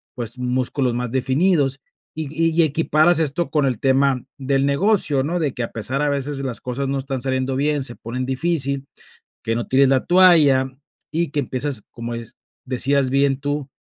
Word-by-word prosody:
pues 120 0 -4
músculos 125 +1 -1
más 120 -1 -3
definidos, 135 +1 +1 0.3
y 155 -1 -4
y 165 +1 +2
equiparas 160 +2 +2
esto 160 +2 -1
con 150 -3 +2
el 125 -4 -2
tema 135 -1 +2
del 135 0 +1
negocio, 150 -1 +2
¿no? 170 +5 -2
De 150 -5 -1
que - - -5
a - - -5
pesar 125 +6 -2
a 150 - +1
veces 140 0 -2
las 130 -4 -4
cosas 130 +2 -3
no 135 +1 -1
están 135 -1 -4
saliendo 130 0 -1
bien, 145 +1 0
se 120 -2 -4
ponen 125 +3 -5
difícil, 140 0 0 0.6
que 115 +1 -1
no 120 - -3
tires 135 +1 +4
la 135 -1 +2
toalla, 160 -8 +5 0.4
y 165 -1 -1
que 145 - -1
empiezas, 130 -3 -3
como 115 0 -6
des 115 -1 -9 0.3
decías 135 +2 +2
bien 135 0 +2
tú, 145 0 -3
135 Hz, 180 wpm, -21 LUFS, 130-150 Hz, 0.6 s, toalla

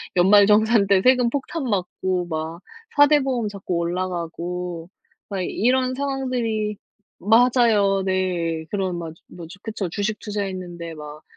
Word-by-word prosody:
연말정산 205 +3 +5
때 195 -1 +4
세금 250 +1 +4
폭탄 285 +4 -3
맞고 185 -4 -2
막 160 +1 -4 0.3
4 290 0 +7
대 300 0 +4
보험 255 -5 -1
자꾸 200 -3 -4
올라가고 175 0 -4 0.4
그러니까 190 -3 -3
이런 255 +3 +1
상황들이 250 -6 -2 0.4
맞아요. 220 -3 +3
네. 175 -4 -1
그런 190 -3 -2
맞아. 165 -2 -7
뭐지 175 +2 -11
그쵸. 215 -5 -4
주식 205 +4 -2
투자했는데 185 -5 -5
막 150 0 -10
195 Hz, 270 characters per minute, -22 LUFS, 175-230 Hz, 0.4 s, 4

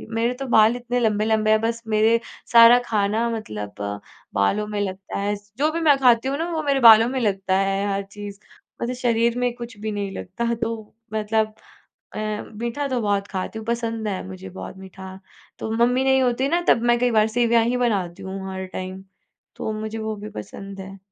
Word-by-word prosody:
मेरे 230 +2 +1
तो 270 - -3
बाल 220 -1 +5
इतने 245 0 -2
लंबे-लंबे 215 -1 +2
हैं 215 - +5
बस 230 +1 -1
मेरे 220 +1 +3 0.3
सारा 235 +1 +9
खाना 215 +2 +1
मतलब 105 - -5 0.6
बालों 150 - +1
में 210 -1 -3
लगता 190 0 -4
है। 205 +1 0
स 205 0 -16
जो 300 +3 +2
भी 330 - -2
मैं 295 -3 +5
खाती 245 -1 +4
हूँ 275 +1 -1
ना 330 +3 -2
वो 320 -2 -1
मेरे 280 -2 +1
बालों 225 -2 +8
में 260 0 -2
लगता 195 -4 0
है 195 +1 0
हर 200 0 -2
चीज़, 205 -1 -8 0.4
मतलब 245 +2 -2
शरीर 235 -1 +1
में 245 -1 0
कुछ 235 -2 -9
भी 215 +1 -4
नहीं 200 -1 -3
लगता। 235 +6 -3
तो 225 -2 -5 0.2
मतलब 215 0 0 0.6
अ, - - -3 0.4
मीठा 235 +6 -3
तो 255 -3 -1
बहुत 200 -1 0
खाती 195 +3 -4
हूँ, 220 - -9
पसंद 230 -2 -2
है 195 -3 -3
मुझे 190 0 -9
बहुत 190 +1 -8
मीठा। 190 0 -10 0.4
तो 220 - -4
मम्मी 240 +3 +2
नहीं 265 0 +4
होती 255 +1 +1
ना 340 +3 +2
तब 230 - +5
मैं 240 - +3
कई 245 0 +2
बार 215 -1 +4
सेवइयाँ 235 0 +3
ही 245 +2 +1
बनाती 200 -8 -1
हूँ 190 +1 -5
हर 190 0 -5
टाइम। 185 +1 -6 0.5
तो - - -3
मुझे 215 +1 -5
वो 220 0 -3
भी 210 +1 -8
पसंद 195 - -8
है। 190 +1 -8
220 Hz, 200 wpm, -23 LUFS, 200-235 Hz, 0.6 s, सारा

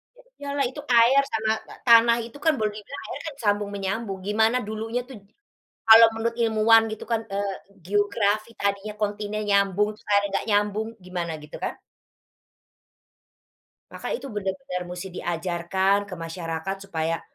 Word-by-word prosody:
Ya - - -19 0.2
iya 285 - -6
lah 275 - +2
itu 280 +3 -8 0.2
air 245 +4 +6
sama, 220 0 0 0.2
te - - -10
tanah 235 0 +7
itu 235 +4 -11
kan 320 - +5
boleh 215 -1 0
dibilang 215 +7 -8
air - - -6
kan 285 - -13
sambung-menyambung 205 0 -1
gimana 220 +3 +3
dulunya 225 +3 -3
tuh 260 - -9 0.7
kalau 225 +1 +10
menurut 230 +1 -2
ilmuwan 225 0 +5
gitu 215 - -6
kan, 225 -1 +1
eee, 200 0 -2 0.3
geografi 205 +2 +1
tadinya 200 +1 -1
kontinen 210 0 -2
nyambung 200 0 +3
terus - - -24
airnya 205 0 +4
enggak - - -1
nyambung, 205 +1 +1 0.2
gimana 175 -2 -3
gitu 150 - -10
kan. - - -1 2.2
Maka - - -7
itu 280 - -7
benar-benar 195 -1 -3
musti 180 +2 -6
diajarkan 175 +3 0
ke 185 - -6
masyarakat 165 +2 -4
supaya 165 -2 -1
205 Hz, 150 wpm, -25 LUFS, 195-225 Hz, 2.2 s, kalau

